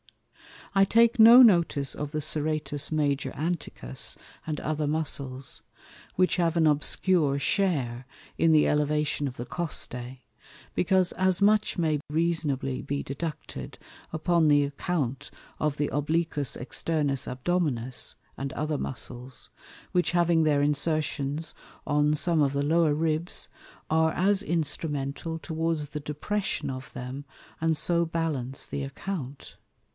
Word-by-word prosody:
I 195 -1 +5
take 230 +4 +4
no 230 +3 +10
notice 170 - +4
of 145 -1 -5
the 155 0 -2
Serratus 150 -1 -2
Major 145 -2 0
Anticus, 150 - -3 0.3
and 155 -2 -2
other 155 -1 -1
Muscles; 140 -4 -3 0.5
which 185 +1 +2
have 170 -2 +1
an 160 - +4
obscure 150 0 +2
share 140 - 0 0.3
in 165 - +4
the 155 - +5
Elevation 150 0 +1
of 130 - -6
the 120 - -5
Costæ, 125 -5 -4 0.5
because 185 0 +2
as 185 +1 +1
much 210 0 +3
may 155 -4 +1
reasonably 150 -5 0
be 140 0 -3
deducted 150 +4 -6 0.4
upon 165 0 +2
the 145 -1 +5
account 140 -2 -2 0.3
of 150 -2 0
the 145 - 0
Obliquus 150 -1 0
externus 140 +1 -2
Abdominis, 130 -3 -1 0.2
and 135 0 -4
other 150 0 -1
Muscles; 125 -1 -6 0.4
which 180 -1 +1
having 170 -2 +3
their 145 -2 +3
Insertions 150 0 -1 0.3
on 150 0 +2
some 165 +1 +1
of 140 -1 +2
the 140 0 0
lower 160 0 +3
Ribs 160 +2 -1 0.4
are 160 0 +3
as 195 +2 +2
instrumental 150 -1 -2
towards 160 -2 -2
the 150 - -5
Depression 150 +8 -2
of 130 0 -8
them, 130 +3 -6 0.3
and 160 0 +2
so 170 +2 +2
balance 155 -6 -2
the 140 - -4
Account. 140 -1 -6
150 Hz, 130 wpm, -27 LUFS, 140-165 Hz, 0.5 s, no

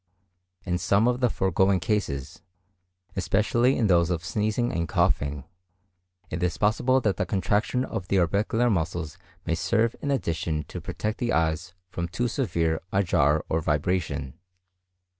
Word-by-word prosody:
In 90 -1 -1
some 105 +5 +3
of 125 0 +1
the 125 -1 +3
foregoing 95 -1 +2
cases, 90 -9 -2 0.7
especially 110 +7 +2
in 115 - +2
those 85 -4 +4
of 85 -2 -2
sneezing 110 +5 0
and 85 -1 -2
coughing, 70 0 +1 0.9
it 80 - -3
is 90 -2 0
possible 120 +5 +2
that 100 -6 0
the - - 0
contraction 105 +7 0
of 90 - -5
the 100 - +1
orbicular 105 +7 +2
muscles 85 -4 -2 0.3
may 85 - 0
serve 110 +8 +1
in 145 - -2
addition 85 - -1
to - - -6
protect 105 +1 -4
the 120 -1 0
eyes 80 +1 0 0.2
from 85 0 -3
too 120 +8 -1
severe 85 - 0
a 100 - +2
jar 75 -3 +2
or 80 - 0
vibration. 75 -3 -1
95 Hz, 150 wpm, -26 LUFS, 80-110 Hz, 0.9 s, those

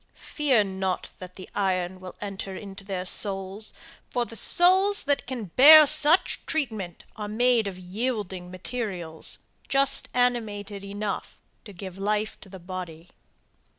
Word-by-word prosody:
Fear 270 -8 +1
not 190 -1 -3
that 180 -1 -10
the 185 - -10
iron 185 -2 -1
will 185 -1 -10
enter 195 -1 -6
into 195 -1 -9
their 190 -2 -4
souls 195 +2 -1 0.4
for 245 -1 -1
the 230 - -11
souls 375 - +5
that 285 -3 -1
can 235 -8 -6
bear 305 +3 +10
such 310 +4 +4
treatment 220 - -3
are 210 -1 -5
made 230 0 +2
of 190 -2 -6
yielding 190 -1 -4
materials, 185 -4 -5 0.3
just 275 0 +2
animated 215 -5 -1
enough 200 0 -5 0.3
to 210 - -10
give 190 0 -9
life 210 +2 -2
to 195 - -12
the 190 - -10
body. 175 -2 -8
205 Hz, 140 wpm, -25 LUFS, 185-245 Hz, 0.4 s, bear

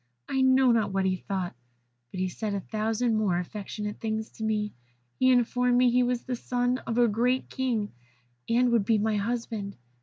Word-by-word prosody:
I 265 - 0
know 260 -1 +5
not 220 -3 +2
what 195 0 0
he 185 0 +2
thought, 185 -4 -4 0.5
but 185 - -7
he 185 - +1
said 205 +2 -3
a - - -1
thousand 220 +3 -1
more 200 -5 +1
affectionate 210 +3 -5
things 220 0 -3
to 220 - -8
me. 215 -1 -1 0.5
He 255 - +4
informed 245 0 +3
me 250 -1 +5
he 250 +1 +3
was 245 -1 0
the 255 - -3
son 245 +1 -1
of 230 - -2
a 240 -1 +5
great 245 +4 0
king, 235 -6 -1 0.6
and 240 +1 +3
would 230 -3 +3
be 220 +2 +2
my 215 0 +1
husband. 220 -2 -3
225 Hz, 190 wpm, -27 LUFS, 210-245 Hz, 0.6 s, know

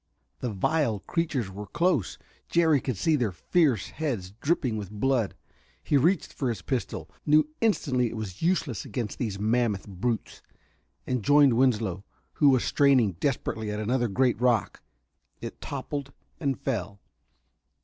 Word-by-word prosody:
The 125 - -2
vile 110 +1 0
creatures 150 - -2
were 105 +2 -7
close: 170 - 0 0.3
Jerry 160 -5 +3
could 130 -6 -3
see 160 - +2
their 120 -8 0
fierce 130 - +1
heads 120 - -3
dripping 140 -7 +1
with 105 -3 -5
blood. 115 +1 0 0.5
He - - +1
reached 165 +6 +2
for 130 - -1
his 105 -6 -4
pistol, 130 -4 -3 0.2
knew 150 0 +4
instantly 135 - +2
it 115 - -7
was 100 -4 -6
useless 160 - 0
against 115 -5 -4
these 110 -6 -2
mammoth 110 -1 0
brutes, 105 +4 -3 0.6
and 125 -2 -1
joined 145 +3 +5
Winslow, 110 -7 +1 0.3
who 145 - +4
was 130 -3 +3
straining 135 -7 +4
desperately 115 -5 -1
at 105 0 -3
another 120 +3 +1
great 120 +2 +1
rock. 120 -4 +1 0.6
It - - -8
toppled 140 -1 -5 0.3
and 140 -5 -1
fell. 105 -8 -3
125 Hz, 145 wpm, -27 LUFS, 105-145 Hz, 0.6 s, joined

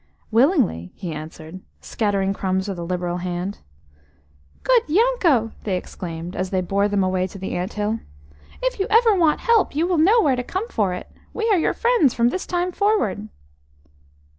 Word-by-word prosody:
"Willingly," 230 - +2
he 175 - -6
answered, 155 +3 -9 0.2
scattering 200 -3 -1
crumbs 190 0 -1
with 195 -3 -4
a - - -4
liberal 175 0 -2
hand. 180 +2 -4 1.1
OOD - - +3
Yanko!" 345 - +3
they 190 -3 -1
exclaimed, 175 0 -7
as 185 0 -2
they 190 - 0
bore 200 +3 +1
them 200 -2 +1
away 185 0 0
to 195 - -11
the 190 - -5
ant 180 +4 -3
hill. 210 +2 -1 0.6
"If - - -1
you 390 - 0
ever 455 0 +5
want 330 -6 +2
help, 460 -10 +2
you 320 +3 +2
will 350 -2 +1
know 405 +9 +5
where 285 - +3
to 250 - -2
come 380 - -3
for 195 -4 0
it. - - -8 0.3
We 450 0 -1
are 390 - +4
your - - +1
friends 470 - +3
from 235 0 +3
this 370 - -4
time 355 0 -1
forward." 405 - 0
215 Hz, 180 wpm, -22 LUFS, -, 1.1 s, ever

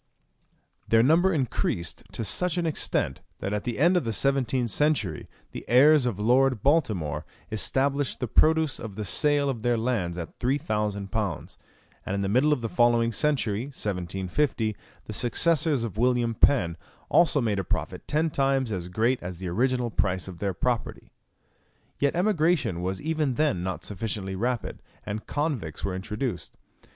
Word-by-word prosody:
Their 115 0 +4
number 165 +8 +4
increased 125 - -1
to - - -2
such 180 - +1
an 175 - 0
extent, 160 - -1 0.2
that 100 - -4
at 105 - -3
the 120 - -3
end 170 +6 +4
of 180 - +2
the 115 - -2
seventeenth 130 -1 +1
century 140 - 0 0.2
the - - -7
heirs 140 +2 +6
of 115 -6 -2
Lord 125 +2 +2
Baltimore 105 - +1 0.3
estimated 135 +5 +1
the 125 - -2
produce 160 +4 +3
of 105 -4 -7
the 105 - -4
sale 145 - +2
of 130 -5 -2
their 120 0 +1
lands 110 -8 -1
at 85 -2 -7
three 130 +3 +1
thousand 105 - -2
pounds; 100 -8 -3 0.4
and 95 - -3
in 100 - -1
the 95 - -1
middle 130 +8 +3
of 145 -5 +1
the 115 - -2
following 120 0 +3
century, 120 -4 0
1750, 105 +1 -2 0.3
the 110 - -7
successors 145 +3 +2
of 110 -2 -5
William 120 -1 +2
Penn 90 -8 +3 0.3
also 165 -4 +4
made 110 -6 0
a - - -1
profit - - -4
ten 155 +2 +1
times 135 -3 +1
as 90 -3 -3
great 115 +7 0
as 90 0 -6
the 90 0 -5
original 125 +5 0
price 95 -3 -1
of 90 -3 -9
their 100 -3 -2
property. 120 +3 -2 0.9
Yet 140 +2 +1
emigration 170 - +1
was 95 +1 -2
even 155 -4 0
then 150 - +1
not 90 -3 -4
sufficiently 100 -1 -4
rapid, 120 +4 -2 0.2
and 105 +1 -5
convicts 145 - -2
were 95 - -2
introduced. 105 - -4
120 Hz, 165 wpm, -26 LUFS, 100-140 Hz, 0.9 s, heirs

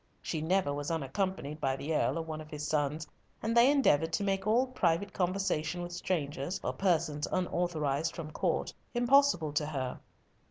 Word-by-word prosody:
She 160 - -2
never 175 -2 +1
was 145 0 -3
unaccompanied 160 0 -2
by 135 -1 +1
the 145 +4 -3
Earl - - +1
or 165 - -2
one 155 -1 -5
of 155 - -11
his 150 -1 -5
sons, 150 +1 0 0.4
and 225 +1 0
they 235 +3 +7
endeavoured 165 - +3
to 200 - +1
make 195 0 0
all 235 +4 +4
private 200 -6 0
conversation 175 -3 -1
with 175 - -6
strangers, 160 -1 -2
or - - -1
persons 155 -6 +1
unauthorised 165 -5 0
from 155 -2 -6
Court, - - -1 0.2
impossible 245 - +4
to 150 0 0
her. 130 -4 -3
165 Hz, 170 wpm, -31 LUFS, 150-195 Hz, 0.4 s, they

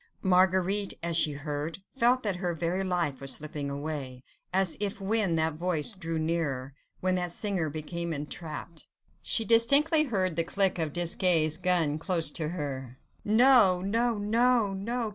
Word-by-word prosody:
Marguerite 190 +2 +2
as 170 -1 -1
she 155 -2 +3
heard, 145 +2 -5 0.2
felt 250 0 +2
that 200 -4 -2
her 175 -2 -2
very 170 +4 -2
life 170 -8 -2
was 135 -1 -1
slipping 145 -1 -5
away, 140 -3 -5 0.3
as 190 -1 +2
if 200 -1 -2
when 200 -3 +1
that 160 0 +1
voice 170 +4 -1
drew 165 -4 -4
nearer, 155 -5 -2 0.3
when 185 0 +1
that 180 -1 -1
singer 180 -3 0
became 170 +3 -5
entrapped... 155 +2 -6 0.3
She 225 - 0
distinctly 280 - +4
heard 185 - -1
the 165 - +2
click 190 +1 +1
of 160 -2 -1
Desgas' 170 -1 +2
gun 170 -4 +1
close 165 -3 -1
to 155 -1 -3
her.... 135 -6 -5 0.3
No! 220 -4 +5
no! 230 +4 0
no! 225 0 +2
no! 230 +4 -3
175 Hz, 155 wpm, -28 LUFS, 155-200 Hz, 0.3 s, No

